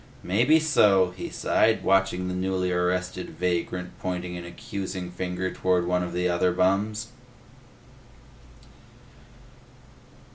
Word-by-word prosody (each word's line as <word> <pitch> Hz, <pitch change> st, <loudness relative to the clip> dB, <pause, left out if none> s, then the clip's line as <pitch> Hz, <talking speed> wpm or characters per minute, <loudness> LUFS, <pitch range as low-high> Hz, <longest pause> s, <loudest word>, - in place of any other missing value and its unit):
"Maybe 120 Hz, -, +4 dB
so," 100 Hz, -, +4 dB
he 95 Hz, -, -6 dB
sighed, 110 Hz, 0 st, +1 dB
watching 95 Hz, -1 st, +2 dB
the 90 Hz, -, -3 dB
newly 90 Hz, 0 st, -1 dB
arrested 90 Hz, +1 st, -1 dB
vagrant 90 Hz, 0 st, -2 dB
pointing 90 Hz, -1 st, -4 dB
an 90 Hz, -, -6 dB
accusing 95 Hz, -2 st, -6 dB
finger 90 Hz, +1 st, -3 dB
toward 90 Hz, -1 st, +1 dB
one 90 Hz, 0 st, +1 dB
of 90 Hz, -1 st, -3 dB
the 90 Hz, 0 st, 0 dB
other 90 Hz, +1 st, +2 dB
bums. 105 Hz, +5 st, 0 dB
90 Hz, 110 wpm, -26 LUFS, 90-95 Hz, -, Maybe